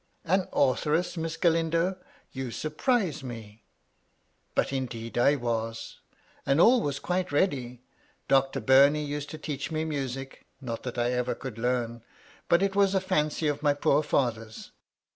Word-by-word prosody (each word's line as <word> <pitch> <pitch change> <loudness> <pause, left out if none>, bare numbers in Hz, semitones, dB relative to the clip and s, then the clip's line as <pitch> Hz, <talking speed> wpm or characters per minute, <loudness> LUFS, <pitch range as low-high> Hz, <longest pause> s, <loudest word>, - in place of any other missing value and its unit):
An 185 +2 +1
authoress. 150 +6 +1
Miss 165 -1 -3
Galindo! 165 +1 +1 0.4
You 130 -1 -5
surprise 155 - -1
me 115 -4 -9 0.3
!" - - -44
" - - -44
But, - - +1
indeed, 120 -4 -4
I 140 +4 +4
was. 115 -2 -3 0.5
All 225 - +5
was 140 -5 -2
quite 180 +3 -2
ready. 130 -6 -1 0.4
Doctor 135 0 +2
Bumey 140 +3 +5
used 145 0 -4
to 155 - -7
teach 145 -2 -4
me 155 0 -1
music: 135 -3 -5
not 115 -4 -5
that 125 -1 -6
I 120 0 +1
ever 125 0 -1
could 125 -4 -8
learn, 120 -1 -1 0.5
but 170 +3 +4
it 195 0 0
was 200 -1 +3
a - - +4
fancy 155 -4 0
of 145 -1 -1
my 145 -1 +2
poor 145 0 +2
father's. 115 -7 -2
140 Hz, 155 wpm, -28 LUFS, 125-160 Hz, 0.5 s, All